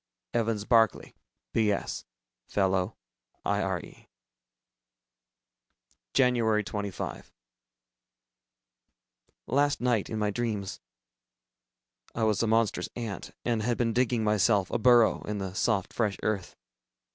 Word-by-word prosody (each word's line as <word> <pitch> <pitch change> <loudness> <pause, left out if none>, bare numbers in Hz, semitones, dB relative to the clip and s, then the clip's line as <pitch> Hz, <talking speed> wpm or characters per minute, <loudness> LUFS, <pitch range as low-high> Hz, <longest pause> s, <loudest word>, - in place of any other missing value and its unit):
EVANS 115 -3 0
BARCLAY, 115 -4 +3 0.4
B.S. 105 -3 0 0.4
Fellow 95 +1 0 0.5
IRE. - - -2 2.1
Jan. 125 -2 +5 0.3
25. 100 -2 -5 2.1
Last 145 +3 +2
night, 120 -4 +1
in 110 - -3
my 105 -1 0
dreams, 105 -4 -3 1.4
I 115 - -1
was 110 -2 +2
a 115 - +1
monstrous 110 -4 +1
ant, 115 -5 -5 0.2
and 115 -2 +1
had 120 +2 0
been 115 -2 +1
digging 120 -1 +1
myself 105 -2 +2
a - - 0
burrow 120 -1 +5
in 105 0 -3
the 95 -2 -4
soft 100 -1 0
fresh 105 -4 0
earth. 100 -4 -2
110 Hz, 100 wpm, -28 LUFS, 100-120 Hz, 2.1 s, Jan